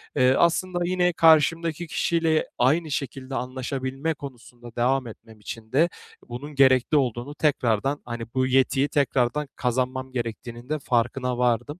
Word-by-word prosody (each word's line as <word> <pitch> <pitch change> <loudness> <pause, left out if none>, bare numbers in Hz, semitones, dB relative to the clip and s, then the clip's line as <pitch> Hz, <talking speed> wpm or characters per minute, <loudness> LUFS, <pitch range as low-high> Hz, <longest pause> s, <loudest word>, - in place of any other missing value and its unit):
eee, 130 -2 +4
aslında 175 +3 +1
yine 180 0 +1
karşımdaki 165 +1 +3
kişiyle 165 0 +1
aynı 150 +6 +2
şekilde 135 0 -4
anlaşabilme 130 +4 -3
konusunda 120 -4 -11
devam 130 +1 +1
etmem 110 0 -13
için 110 +1 -9
de 160 +6 +3 0.4
bunun 145 +5 -7
gerekli 130 +1 +4
olduğunu 130 +1 -1
tekrardan, 135 -2 0
hani, 120 -1 -5
bu 130 0 +1
yetiyi 135 +1 +2
tekrardan 140 +1 0
kazanmam 130 +1 -2
gerektiğinin 120 0 -6
de 155 0 -1
farkına 125 0 -1
vardım. 125 +5 0
130 Hz, 130 wpm, -24 LUFS, 120-150 Hz, 0.4 s, eee